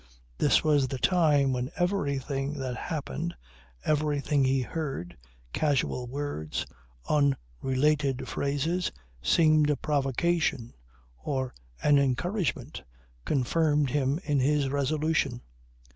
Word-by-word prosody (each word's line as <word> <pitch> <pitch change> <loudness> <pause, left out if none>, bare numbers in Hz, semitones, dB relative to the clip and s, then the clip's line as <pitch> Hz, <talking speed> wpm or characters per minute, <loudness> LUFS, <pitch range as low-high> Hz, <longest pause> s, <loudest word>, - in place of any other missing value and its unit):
This - - +4
was 145 -3 +3
the 135 - -4
time 145 -4 +3
when 125 0 -2
everything 140 -6 -1
that 130 -4 -4
happened, 165 +2 -4 0.5
everything 150 -2 +1
he 130 0 +2
heard, 135 - -4 0.4
casual 135 -4 0
words, 130 - -3 0.4
unrelated 135 - +1
phrases, 150 +6 -1 0.3
seemed 155 - +4
a 150 - +3
provocation 145 -2 0 0.5
or 130 -3 -2 0.3
an 145 -1 +5
encouragement, 140 - -1 0.4
confirmed 145 +1 +1
him 140 +2 +1
in 145 -2 +1
his 140 +1 +2
resolution. 145 -2 0
145 Hz, 100 wpm, -28 LUFS, 130-155 Hz, 0.5 s, an